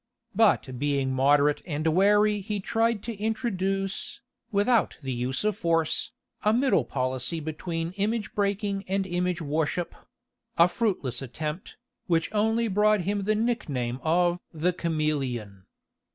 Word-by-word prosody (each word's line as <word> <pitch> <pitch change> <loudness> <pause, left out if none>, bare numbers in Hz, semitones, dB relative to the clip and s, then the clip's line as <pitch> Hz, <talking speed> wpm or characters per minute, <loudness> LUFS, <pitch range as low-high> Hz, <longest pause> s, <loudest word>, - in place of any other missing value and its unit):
But 190 - +2
being 140 -2 0
moderate 145 +2 +3
and 155 -2 -3
wary 205 +5 +4
he 205 +1 -3
tried 225 +1 0
to 235 - -4
introduce, 200 +2 -2 0.3
without 215 +3 +2
the 130 -1 -2
use 125 +6 -2
of 210 -2 +1
force, 165 -5 0 0.3
a 210 - +3
middle 245 - +3
policy 130 +5 -1
between 165 +2 -4
image 210 +1 -1
breaking 200 -1 -1
and 195 +1 0
image 180 -1 -1
worship—a 160 +2 -1
fruitless 175 - -1
attempt, 150 - -5 0.3
which 165 +1 +1
only 220 +2 +2
brought 210 0 +3
him 200 +2 -1
the 215 +1 +2
nickname 140 - -1
of 175 +2 +2
"the 170 +3 0
Chameleon." 135 - -2
180 Hz, 125 wpm, -27 LUFS, 150-210 Hz, 0.3 s, wary